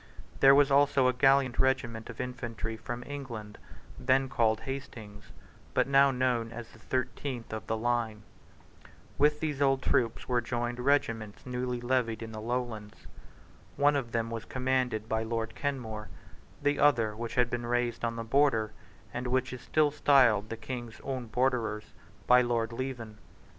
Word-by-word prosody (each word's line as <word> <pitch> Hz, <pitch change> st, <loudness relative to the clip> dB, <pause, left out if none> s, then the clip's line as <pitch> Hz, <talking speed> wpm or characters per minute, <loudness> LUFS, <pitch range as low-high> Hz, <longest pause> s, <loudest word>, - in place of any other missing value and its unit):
There 135 Hz, 0 st, +8 dB
was 145 Hz, 0 st, +4 dB
also 140 Hz, -2 st, +4 dB
a 130 Hz, -, +3 dB
gallant 135 Hz, 0 st, +3 dB
regiment 120 Hz, -4 st, 0 dB
of 115 Hz, -, -9 dB
infantry 120 Hz, -3 st, -4 dB
from 120 Hz, +2 st, -6 dB
England, 120 Hz, -7 st, -7 dB, 0.4 s
then 130 Hz, +1 st, +2 dB
called 110 Hz, -4 st, +1 dB
Hastings's, 115 Hz, -6 st, -8 dB, 0.4 s
but -, -, +3 dB
now 140 Hz, 0 st, +5 dB
known 125 Hz, -3 st, 0 dB
as 120 Hz, -1 st, -7 dB
the 110 Hz, -, -17 dB
thirteenth 130 Hz, 0 st, -3 dB
of 110 Hz, 0 st, -6 dB
the 110 Hz, -, -1 dB
line. 115 Hz, -2 st, -1 dB, 1.0 s
With 150 Hz, +1 st, +4 dB
these 150 Hz, -3 st, -2 dB
old 135 Hz, -2 st, +3 dB
troops 115 Hz, -2 st, 0 dB
were 125 Hz, -1 st, +1 dB
joined 120 Hz, +1 st, -3 dB
two -, -, -5 dB
regiments 115 Hz, -7 st, 0 dB
newly 125 Hz, -1 st, -3 dB
levied 120 Hz, -3 st, 0 dB
in 110 Hz, -, -7 dB
the 110 Hz, -1 st, -7 dB
Lowlands. 110 Hz, -, -4 dB, 0.7 s
One 145 Hz, +1 st, +4 dB
of 125 Hz, -5 st, -2 dB
them 115 Hz, 0 st, -1 dB
was 115 Hz, -1 st, -4 dB
commanded 125 Hz, -4 st, -1 dB
by 110 Hz, 0 st, 0 dB
Lord 115 Hz, 0 st, -3 dB
Kenmore; 115 Hz, -7 st, -4 dB, 0.5 s
the 145 Hz, 0 st, +2 dB
other, 115 Hz, -7 st, +3 dB
which 115 Hz, +1 st, -5 dB
had 125 Hz, -1 st, +2 dB
been 120 Hz, -1 st, -3 dB
raised 120 Hz, -1 st, -1 dB
on 115 Hz, 0 st, -1 dB
the 115 Hz, -, -4 dB
Border, 115 Hz, -3 st, +2 dB, 0.4 s
and 125 Hz, +1 st, -3 dB
which 130 Hz, +1 st, 0 dB
is 125 Hz, -, -7 dB
still 155 Hz, -2 st, +2 dB
styled 125 Hz, -8 st, +4 dB
the 115 Hz, -, -5 dB
King's 120 Hz, -1 st, -7 dB
own 130 Hz, -3 st, -4 dB
Borderers, 110 Hz, -3 st, -1 dB, 0.3 s
by 125 Hz, 0 st, +6 dB
Lord 120 Hz, -2 st, 0 dB
Leven. 115 Hz, -4 st, -5 dB
120 Hz, 165 wpm, -30 LUFS, 115-130 Hz, 1.0 s, There